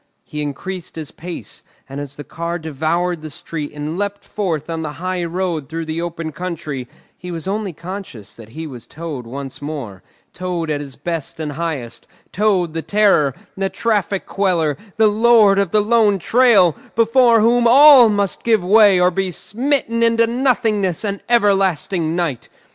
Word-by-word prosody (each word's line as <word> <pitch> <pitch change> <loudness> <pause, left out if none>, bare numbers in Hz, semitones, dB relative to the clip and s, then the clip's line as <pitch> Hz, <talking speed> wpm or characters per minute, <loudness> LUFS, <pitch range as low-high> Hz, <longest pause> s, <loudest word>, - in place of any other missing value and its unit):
He 150 - -6
increased 165 +5 -6
his 155 -3 -7
pace, 175 +1 -8 0.3
and 140 +1 -6
as 140 -1 -8
the 145 - -8
car 170 +2 -4
devoured 160 +2 -2
the 155 - -7
street 150 0 -6
and 150 +4 -5
leapt 200 0 -3
forth 170 -8 -3
on 165 -1 -4
the 150 -2 -4
high 185 +2 -3
road 170 -4 -3
through 165 0 -4
the 160 +1 -3
open 165 -2 -4
country, 150 -7 -5 0.3
he 180 - -10
was 170 0 -6
only 205 0 -2
conscious 170 - -8
that 110 -2 -13
he 160 +7 -7
was 125 -6 -9
Toad 150 -7 -7
once 135 +2 -7
more, 135 -11 -6 0.3
Toad 175 -3 -3
at 145 -1 -2
his 140 -3 -9
best 160 0 -5
and 155 -2 -3
highest, 140 -7 -5 0.2
Toad 185 -5 +1
the 165 - -3
terror, 195 -10 +2 0.2
the 195 0 -1
traffic 205 -4 -1
queller, 175 -7 0 0.2
the 220 - +4
Lord 215 -2 +5
of 200 -3 +1
the 210 +4 +3
lone 215 -2 +3
trail, 205 - +4 0.2
before 230 +1 +4
whom 235 +2 +4
all 270 -1 +8
must 200 -2 -1
give 220 -5 +2
way 200 0 +5
or 180 0 +4
be 190 +1 -2
smitten 235 - -1
into 230 0 +4
nothingness 225 - 0
and 200 -1 -3
everlasting 195 -7 +1
night. 160 -10 -2
180 Hz, 170 wpm, -19 LUFS, 155-210 Hz, 0.3 s, all